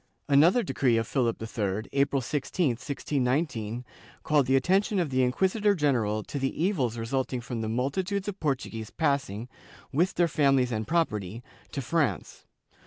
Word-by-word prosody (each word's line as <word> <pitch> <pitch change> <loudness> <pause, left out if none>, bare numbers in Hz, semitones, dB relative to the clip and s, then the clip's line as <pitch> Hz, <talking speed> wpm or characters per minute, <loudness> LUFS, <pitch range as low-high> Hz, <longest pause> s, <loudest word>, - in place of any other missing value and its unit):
^ - - -42 0.3
Another 170 - +5
decree 130 - +1
of 115 - 0
Philip 120 -1 0
III, 110 -2 -2
April 140 -1 +1
20, 150 +4 0
1619, 125 -2 -2 0.4
called 150 -4 +2
the 130 - +3
attention 190 +9 +2
of 170 -6 0
the 130 0 +2
inquisitor 190 - +2
general 115 - +1
to 140 - -5
the 135 +2 -2
evils 135 - 0
resulting 125 +2 -2
from 120 -1 -5
the 110 - -2
multitudes 185 - -1
of 205 -1 -4
Portuguese 125 -7 -2
passing, 135 -8 -1 0.4
with 170 +7 +1
their 175 - +3
families 135 -5 +2
and 110 -1 -2
property, 115 - -1 0.3
to 140 - -4
France. 160 +1 -1
135 Hz, 155 wpm, -28 LUFS, 115-160 Hz, 0.4 s, Another